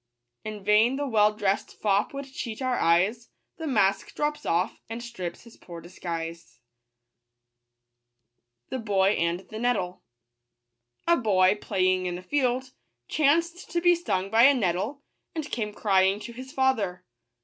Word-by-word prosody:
In 215 -2 -7
vain 215 +5 +4
the 285 +1 -2
well 215 -5 +4
dress'd 205 -2 -1
fop 205 -1 +1
would 275 0 -6
cheat 225 -5 -5
our 255 -2 0
eyes; 190 +8 +2 0.3
The 320 - -5
mask 195 -6 +1
drops 295 0 -2
off, 175 +2 0
and 230 +1 -5
strips 185 -8 -6
his 235 -1 -16
poor 170 -2 -10
disguise. 165 -5 -7 2.1
Bog 260 - -3 0.3
anb 170 +2 -1
Kettle. 215 -5 -2 1.1
■ 340 -7 +3
BOY, 185 -3 +4
playing 185 -2 +1
in 175 0 -3
a 180 - -10
field, 255 +2 0 0.4
chanced 335 +4 +1
to 345 - 0
be 350 +1 +5
stung 195 - -2
by 225 +1 +5
a 280 +1 +7
nettle, 210 +6 -1 0.3
and 310 -2 -4
came 210 -3 -2
crying 195 -1 +2
to 235 - -8
his 260 +2 -9
father. 210 -10 0
215 Hz, 140 wpm, -26 LUFS, 185-260 Hz, 2.1 s, a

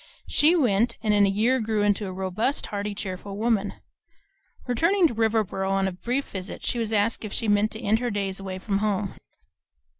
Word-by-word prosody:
She 315 +4 +4
went, 235 - +2
and 215 -1 +2
in 205 -1 +5
a - - +2
year 225 +7 +2
grew 220 -2 0
into 205 0 +1
a - - -5
robust, 190 +8 -1
hearty, 205 0 -4
cheerful 195 0 -6
woman. 215 -2 0 0.9
Returning 335 - +3
to 285 - -5
Riverboro 220 -4 0
on 195 0 +1
a - - -1
brief 245 +10 -3
visit, 190 -1 -6
she 240 - 0
was 225 -1 -1
asked 215 +2 +1
if 215 - -5
she 225 - -2
meant 205 +1 +3
to 220 - -8
end 215 +1 +2
her 245 0 -1
days 195 -3 -2
away 190 -1 -5
from 195 +1 -1
home. 205 -2 -1
210 Hz, 200 wpm, -25 LUFS, 195-230 Hz, 0.9 s, in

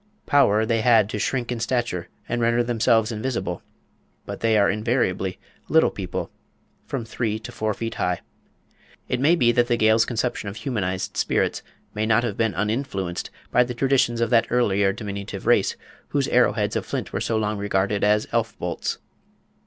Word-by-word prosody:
Power 110 -6 +4
they 115 0 +1
had 110 -3 +4
to - - -3
shrink 125 -2 -1
in 120 - -2
stature 120 -7 -2 0.2
and 120 - -1
to - - -2
render 120 +1 +3
themselves 115 -1 +2
invisible, 115 +3 -3 0.6
but - - -6
they 115 -1 +2
are 100 -1 +4
invariably 105 -3 0 0.3
"little - - +4
people," - - -5 0.6
from 125 -5 -3
three 110 -1 -2
to 110 - -9
four 110 -1 -2
feet 115 0 -4
high. 90 -1 -1 0.9
It 125 - -1
may 150 +6 +4
be 120 -8 +4
that 120 0 +2
the 120 -1 +1
Gael's 110 +1 +4
conception 120 -3 -2
of 100 - -8
humanised 105 -6 -3
spirits - - 0 0.3
may 105 +1 -1
not 115 +1 +3
have 115 -5 -2
been 115 -2 0
uninfluenced 105 -5 -2 0.2
by 125 - +5
the 125 0 -5
traditions 125 -2 +2
of 115 - 0
that 115 -2 +4
earlier 100 -5 +2
diminutive 100 -1 -6
race - - +3 0.3
whose - - 0
arrow - - +4
heads - - -1
of - - 0
flint - - -4
were - - -2
so 115 - 0
long 105 -1 -1
regarded 100 0 0
as 105 +1 +3
"elf 115 -1 -1
bolts." - - -3
115 Hz, 180 wpm, -23 LUFS, 105-120 Hz, 0.9 s, by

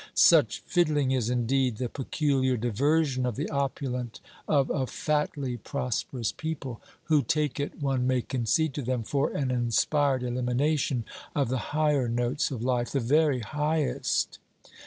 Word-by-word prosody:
Such - - +5
fiddling 150 -6 +2
is 125 -4 +1
indeed 125 0 +1
the 125 - -2
peculiar 135 0 0
diversion 130 +4 +1
of 125 -3 -1
the 145 - -2
opulent 130 -4 -2 0.3
of 140 -3 +2
a 130 -3 0
fatly 145 -4 -1
prosperous 125 -2 -3
people; 155 -8 -5 0.2
who 155 -3 +3
take 150 -2 -1
it, 145 - -4
one 135 -3 0
may 130 -2 +1
concede 135 +5 0
to 145 - -3
them, 125 -2 -1
for 140 +5 0
an 135 -3 -1
inspired 130 +3 +1
elimination 125 +1 0 0.3
of 140 -4 +1
the 130 0 0 0.2
higher 150 -5 +2
notes 120 +4 0
of 125 -5 -5
life: 125 -1 0
the 140 - 0
very 140 +1 +2
highest. 150 +4 -1
130 Hz, 145 wpm, -28 LUFS, 125-145 Hz, 0.3 s, Such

